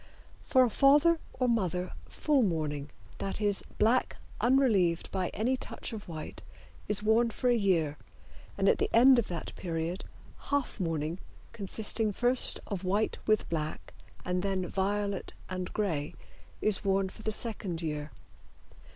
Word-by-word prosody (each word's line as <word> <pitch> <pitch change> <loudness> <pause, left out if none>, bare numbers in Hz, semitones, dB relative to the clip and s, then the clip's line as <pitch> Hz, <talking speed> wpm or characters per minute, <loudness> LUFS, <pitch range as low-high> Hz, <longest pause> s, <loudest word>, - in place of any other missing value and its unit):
For 260 -2 +4
a 250 - +3
father 295 +7 +5
or 255 - 0
mother 185 -6 0 0.2
full 295 -3 +2
mourning, 155 - -1 0.3
that 195 - -2
is, 205 -2 +1 0.2
black 230 +4 +2 0.2
unrelieved 220 -9 +3
by 185 -2 -1
any 240 +5 0
touch 255 - -6
of 215 -2 -7
white, 160 -3 -7 0.5
is 210 0 0
worn 225 +2 +4
for 245 +3 0
a - - +4
year, 170 -9 +1 0.6
and 195 0 +2
at - - +4
the - - +1
end 255 +2 +8
of 230 - -1
that 170 -2 -5
period 170 +1 -3 0.5
half 285 -5 -1
mourning, 165 -1 -2 0.3
consisting 215 +1 -1
first 245 +4 +2
of 195 -3 -4
white 200 +4 0
with 215 0 +2
black, 155 -2 -4 0.3
and 180 0 0
then 190 -1 -1
violet 200 0 -1 0.2
and 185 -1 -4
gray, 160 -9 -2 0.5
is 215 -3 +2
worn 195 -1 +2
for 190 - -12
the 220 - -1
second 205 -7 -3
year. 150 -1 -3
200 Hz, 150 wpm, -30 LUFS, 175-230 Hz, 0.6 s, end